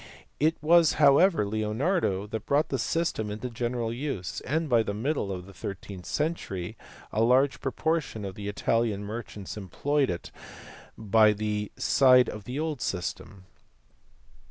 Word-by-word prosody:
It 160 +2 +3
was 165 0 +5
however 145 - +5
Leonardo 110 - 0
who 110 +1 -3
brought 140 +8 +1
the 135 - -1
system 140 -7 -1
into 110 +4 -5
general 120 0 -2
use, 125 -8 -4
and 160 +5 0
by 120 -4 +4
the 100 -2 -3
middle 115 -2 -1
of 90 -1 -5
the 100 - -13
thirteenth 95 0 -7
century 145 - -3 0.4
a 110 - 0
large 130 +4 +3
pro 135 - -2
portion 160 -11 -1
of 95 - -5
the 100 +1 -7
Italian 105 0 0
merchants 105 -2 -7
employed 135 +8 0
it 85 - -5 0.7
by 110 0 +4
the 105 0 -3
side 125 -2 +5
of 105 -2 -8
the 130 +4 -4
old 155 -5 -2
system. 95 +1 -4
115 Hz, 150 wpm, -27 LUFS, 100-145 Hz, 0.7 s, was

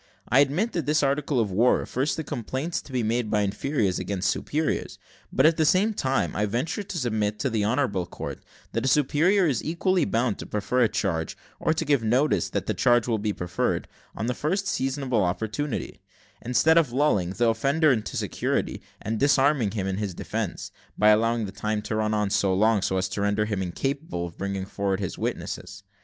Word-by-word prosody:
I 130 - +4
admit 155 - +2
that 165 -6 -2
this 150 0 +2
article 140 -1 +1
of 105 -4 0
war 115 +7 +4
refers 135 +4 -1
to 160 - -4
complaints 135 +6 -3
to - - -15
be 125 -2 0
made 115 0 0
by 105 -1 +2
inferiors 100 -1 0
against 100 -1 -1
superiors; 155 +1 -2 0.3
but, - - +3
at 160 0 +5
the 160 - +3
same 190 +8 +3
time, 135 -8 0
I 105 - +1
venture 130 - -2
to 195 -3 -6
submit 110 -6 -1
to 125 +5 -1
the 110 -2 0
honourable 110 -6 0
court, - - -7 0.3
that 115 - -2
a - - 0
superior 150 +8 +3
is 135 -8 0
equally 180 +3 +1
bound 115 -2 0
to - - -7
prefer 105 +5 0
a 115 - +4
charge, 80 -5 -2 0.2
or - - +1
to 160 - -1
give 140 -4 +3
notice 125 +7 +2
that - - -2
that - - -2
charge 120 -2 +4
will 115 -3 0
be 105 0 -1
preferred, 90 -3 -2 0.3
on 110 - -3
the 125 - 0
first 185 +10 -1
seasonable 135 - 0
opportunity, 110 +10 -3 0.4
instead 160 +7 +4
of 150 -7 0
lulling 110 -10 +1
the 115 +3 +2
offender 140 +7 +3
into 110 -4 -1
security, - - -2 0.2
and 110 0 -2
disarming 140 -4 +3
him 100 -1 -3
in 95 -1 -2
his 100 -4 -3
defence, - - -4 0.3
by 105 +1 +5
allowing 115 +1 +3
the 95 - -6
time 105 +1 -2
to - - -3
run 110 0 0
on 105 -2 0
so 95 -2 +2
long 110 +2 +3
as 95 0 0
to 100 +2 -3
render 100 +1 +1
him 105 -3 -2
incapable 115 - -3
of 85 -1 -9
bringing 100 -1 -3
forward 100 -1 -2
his 95 -3 -4
witnesses. 100 +2 -4
115 Hz, 200 wpm, -26 LUFS, 105-145 Hz, 0.4 s, at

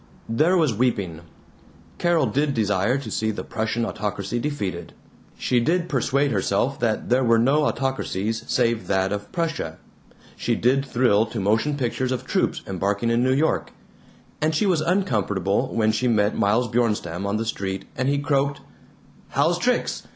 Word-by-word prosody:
There 155 +11 +3
was 155 -8 +2
weeping. 100 -8 -1 0.8
Carol 170 -4 +3
did 140 +5 0
desire 105 +2 +1
to 140 - -6
see 110 - 0
the 110 - -4
Prussian 110 +1 -2
autocracy 105 +1 -3
defeated; 100 -11 -4 0.4
she 125 - +1
did 170 +8 +1
persuade 140 +1 +1
herself 110 +6 0
that 115 -2 -1
there 125 +2 +3
were 115 -1 +4
no 140 +6 +3
autocracies 115 -6 -2
save 115 -2 +1
that 95 0 +1
of 105 0 -4
Prussia; 160 - -2 0.6
she - - -1
did 130 +3 +2
thrill 120 -5 +2
to 110 - -5
motion 110 +9 +1
pictures 130 0 -1
of 130 - -3
troops - - 0
embarking 100 +4 -1
in 115 +1 +2
New 130 +1 +2
York; 155 +3 0 0.7
and 155 +1 +1
she 210 - +2
was 180 -5 +2
uncomfortable 110 - 0
when 110 -1 +2
she 110 +4 0
met 105 -3 +2
Miles 110 +5 +2
Bjornstam 105 -6 -1
on 100 +1 0
the 115 - -2
street 95 -3 -3
and 130 +2 0
he 140 - +2
croaked: 140 0 0 0.7
"How's 165 +6 +1
tricks? 250 +5 -1
120 Hz, 160 wpm, -23 LUFS, 105-140 Hz, 0.8 s, were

